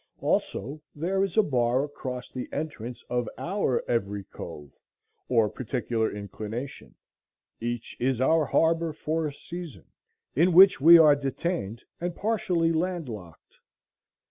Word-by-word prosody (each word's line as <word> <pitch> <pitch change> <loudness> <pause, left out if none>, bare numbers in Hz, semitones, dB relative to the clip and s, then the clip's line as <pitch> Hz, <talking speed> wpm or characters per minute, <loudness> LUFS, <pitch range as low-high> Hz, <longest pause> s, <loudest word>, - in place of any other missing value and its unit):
Also 145 +5 -1
there 185 +6 0
is 195 +1 -3
a 215 - +7
bar 125 -3 +1
across 130 -3 -6
the 125 - -6
entrance 125 -6 -5
of 120 -2 -1
our 150 - -1
every 100 -4 -1
cove, 75 -6 -10 0.6
or 115 -4 +4
particular 115 -1 -2
inclination; 105 +5 -7 0.6
each 120 0 -4
is 130 0 0
our 155 +4 +3
harbor 165 0 +2
for 155 +1 -2
a - - -4
season, 170 -2 -9 0.5
in 170 +6 +4
which 190 -3 +8
we 170 +4 +10
are 155 -3 +7
detained 135 - -3 0.2
and 175 0 -3
partially 180 -6 0
land 170 -2 -1
locked. 90 -8 -11
140 Hz, 130 wpm, -27 LUFS, 120-165 Hz, 0.6 s, we